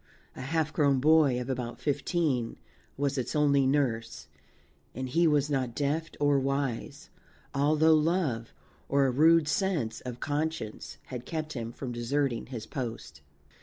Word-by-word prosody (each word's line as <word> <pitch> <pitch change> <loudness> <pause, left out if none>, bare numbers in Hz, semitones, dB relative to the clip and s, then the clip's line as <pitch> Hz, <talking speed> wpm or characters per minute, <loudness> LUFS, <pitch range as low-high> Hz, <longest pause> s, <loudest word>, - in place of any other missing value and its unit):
A - - -7
half 155 +3 -1
grown 140 -3 +3
boy 150 -3 +4
of 125 - -5
about 125 -2 -4
fifteen 145 -4 0 0.4
was 140 -1 0
its 125 - -3
only 140 -2 +3
nurse, 120 -5 -1 0.7
and 130 +2 -3
he 165 +6 +3
was 145 -2 +3
not 130 -5 -1
deft 150 +3 -2
or 145 -1 +3
wise, 135 -3 -3 0.4
although 155 +3 +4
love, 155 -7 +1 0.4
or 140 0 +3
a 130 - +2
rude 160 +4 +5
sense 150 - -1
of 125 -1 -7
conscience, 150 -7 -3 0.2
had 125 -1 -6
kept 155 -1 -4
him 115 -2 -4
from 125 +1 -6
deserting 120 0 -1
his 120 -4 -6
post. 110 - -6
140 Hz, 145 wpm, -29 LUFS, 125-150 Hz, 0.7 s, rude